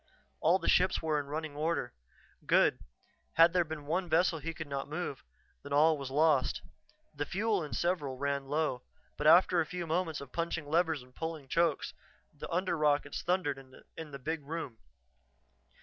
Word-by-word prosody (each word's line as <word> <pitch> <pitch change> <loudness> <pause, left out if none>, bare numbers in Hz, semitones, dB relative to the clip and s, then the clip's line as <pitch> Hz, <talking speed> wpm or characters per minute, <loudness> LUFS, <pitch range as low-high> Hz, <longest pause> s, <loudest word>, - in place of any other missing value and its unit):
All 170 +4 +4
the - - -5
ships 185 +1 +4
were 155 -2 +1
in 145 - -5
running 155 0 -4
order. 155 -4 -1 0.5
Good; - - +4 0.5
had 165 +1 +6
there 180 -1 +3
been 155 -2 -7
one 175 +4 -1
vessel 165 +1 +3
he 165 +3 -4
could 160 0 -7
not 140 -1 -4
move, 155 -3 -4 0.4
then 140 - -7
all 155 +2 +5
was 140 -3 -6
lost. 145 -1 +2 0.5
The 145 0 -2
fuel 205 -1 0
in 150 - -7
several 155 -7 -1
ran 140 0 -2
low, 145 -4 0 0.3
but 150 - 0
after 175 +2 +6
a - - -1
few 180 0 -4
moments 165 -1 -1
of 140 -2 -10
punching 165 -2 -2
levers 160 -3 +1
and 125 0 -20
pulling 160 -3 -5
chokes, 165 +1 +1 0.4
the - - -8
under 180 +1 0
rockets 145 -2 +1
thundered 180 -6 0 0.4
in 160 -1 -7
the 140 - -7
big 155 +4 -3
room. 140 -6 -6
160 Hz, 175 wpm, -32 LUFS, 145-170 Hz, 0.5 s, had